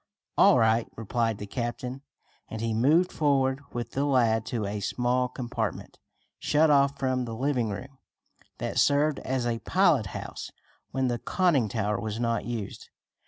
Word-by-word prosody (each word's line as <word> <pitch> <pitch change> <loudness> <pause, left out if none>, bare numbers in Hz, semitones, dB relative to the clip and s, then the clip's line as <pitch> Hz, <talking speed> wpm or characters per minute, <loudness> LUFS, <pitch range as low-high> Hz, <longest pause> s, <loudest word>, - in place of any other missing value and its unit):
"All 200 - +6
right," 115 0 +3
replied 115 0 -1
the 105 - -6
captain, 125 +4 -4 0.5
and 110 - -6
he 115 0 -1
moved 150 +11 +3
forward 135 -2 +1
with 120 -1 -5
the 140 - -1
lad 115 -6 +2
to 115 -4 -2
a 100 +1 -3
small 125 +5 0
compartment, 120 -4 -4 0.4
shut 155 +1 +3
off 140 -1 +3
from 130 -2 0
the 115 -1 -5
living 125 -2 0
room, 130 +6 -7 0.6
that - - -2
served 145 +1 +3
as 130 -2 -2
a 115 -1 -1
pilot 165 - +2
house 95 - -7 0.4
when 130 -1 0
the 120 -1 -1
conning 150 - +1
tower 105 -1 -1
was 110 0 -4
not 115 -1 0
used. 115 -5 -5
120 Hz, 160 wpm, -27 LUFS, 115-140 Hz, 0.6 s, All